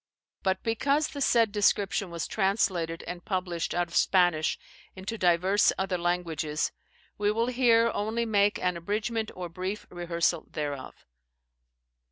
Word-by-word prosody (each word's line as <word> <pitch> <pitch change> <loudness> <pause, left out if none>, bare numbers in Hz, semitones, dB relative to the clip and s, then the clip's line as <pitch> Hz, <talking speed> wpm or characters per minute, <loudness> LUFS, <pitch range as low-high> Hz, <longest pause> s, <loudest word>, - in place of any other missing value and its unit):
But 190 -1 0
because 280 +7 +1
the 285 - -7
said 230 -5 +3
description 200 -2 +1
was 170 -1 -4
translated 190 -5 0
and 175 0 -6
published 180 -4 -2
out 175 0 +1
of 170 - -10
Spanish 175 -4 +3 0.4
into 190 +4 -5
divers 185 +1 +3
other 190 -1 -1
languages, 165 -3 -1 0.5
we 205 0 +2
will 230 +2 +1
here 235 -2 +4
only 220 +3 -1
make 205 -2 +2
an 180 -1 -1
abridgement 215 +5 -2
or 180 -1 -5
brief 185 +4 -5
rehearsal 170 -1 -1
thereof. 145 -3 -5
190 Hz, 135 wpm, -28 LUFS, 175-215 Hz, 0.5 s, here